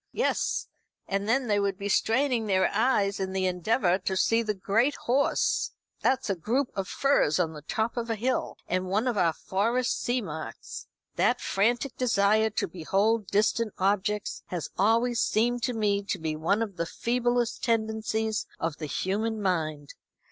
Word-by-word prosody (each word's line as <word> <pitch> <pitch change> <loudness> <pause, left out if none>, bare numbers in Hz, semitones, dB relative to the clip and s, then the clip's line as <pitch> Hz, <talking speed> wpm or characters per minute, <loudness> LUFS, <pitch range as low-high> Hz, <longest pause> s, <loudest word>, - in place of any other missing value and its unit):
"Yes; - - 0 0.4
and 200 +2 -1
then 260 +3 +2
they 205 -3 +2
would 200 -1 0
be 200 - -4
straining 230 +3 +1
their 190 -2 +2
eyes 205 -3 +2
in 190 -1 -2
the 190 -1 0
endeavour 185 +1 +1
to 190 0 -2
see 225 +4 +3
the 215 -2 -2
Great 225 +9 +1
Horse 270 +4 +1 0.3
that's 260 - +1
a 200 - +1
group 240 - 0
of 195 -1 -3
firs 275 - +2
on 165 -3 0
the 150 - -9
top 220 +9 -2
of 235 -1 -2
a 225 - 0
hill, 250 +5 -1
and 185 +1 -1
one 210 +6 0
of 245 - +1
our 175 -4 +3
Forest 230 +9 -1
seamarks. 185 - -4 0.3
That - - +3
frantic 240 +6 0
desire 220 -2 +3
to 215 - -2
behold 200 +5 0
distant 215 +1 +1
objects 200 +1 0
has 170 -5 -4
always 230 +4 +2
seemed 240 +2 +1
to 250 - -1
me 205 -3 +1
to 200 - -2
be 160 -2 -3
one 195 +8 +1
of 200 -5 -7
the 170 - -1
feeblest 240 +2 0
tendencies 220 -1 0
of 165 -1 -2
the 155 - -5
human 215 +8 -1
mind. 155 -7 -2
210 Hz, 170 wpm, -27 LUFS, 190-230 Hz, 0.4 s, see